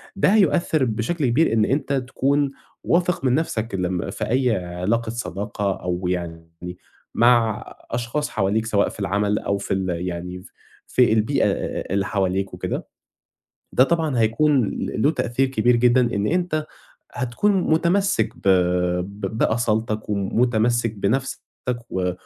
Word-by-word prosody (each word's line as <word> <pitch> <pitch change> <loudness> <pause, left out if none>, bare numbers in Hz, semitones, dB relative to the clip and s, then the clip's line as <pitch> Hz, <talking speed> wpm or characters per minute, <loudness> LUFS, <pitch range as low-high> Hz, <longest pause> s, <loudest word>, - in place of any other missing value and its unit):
ده 190 - +3
هيؤثّر 170 -7 +3
بشكل 120 +8 -1
كبير 125 +3 +2
إن 110 -1 +3
أنت 140 +2 -1
تكُون 135 +2 0 0.3
واثق 175 -3 +1
من 125 -1 +3
نَفْسك 115 -9 -2
لمّا 90 0 -2
في 110 - -4
أي 125 -2 +2
علاقة 100 +7 -1
صداقة 105 -3 -3
أو 90 0 -2
يعني 85 0 -6 0.4
مع 115 -2 +3 0.3
أشخاص 120 +5 -2
حواليك 110 +2 0
سواء 105 -3 +1
في - - -12
العمل 105 +1 0
أو 100 - -1
في - - -3
ال 95 -1 -2 0.2
يعني 90 +1 -5 0.4
في 125 -3 +3
البيئة 110 +6 +2 0.5
اللي 100 0 +1
حواليك 95 -1 -1
وكده، - - -4 0.9
ده 130 - +6
طبعًا 160 -4 0
هيكُون 125 +4 +3
ل - - -3
له 145 - +4
تأثير 135 -3 0
كبير 125 -1 +2
جدًا 120 +1 +4
إن 100 +1 0
أنت 170 -3 0 0.5
هتكُون 125 - 0 0.2
مُتمسِّك 170 - +2
ب - - -18 0.6
ب 100 +2 -6
بأصالتك 110 -2 0
ومُتمسِّك 115 +3 +1
بنَفْسك 125 +6 -1 0.5
و 90 -1 -1
115 Hz, 135 wpm, -22 LUFS, 100-135 Hz, 0.9 s, ده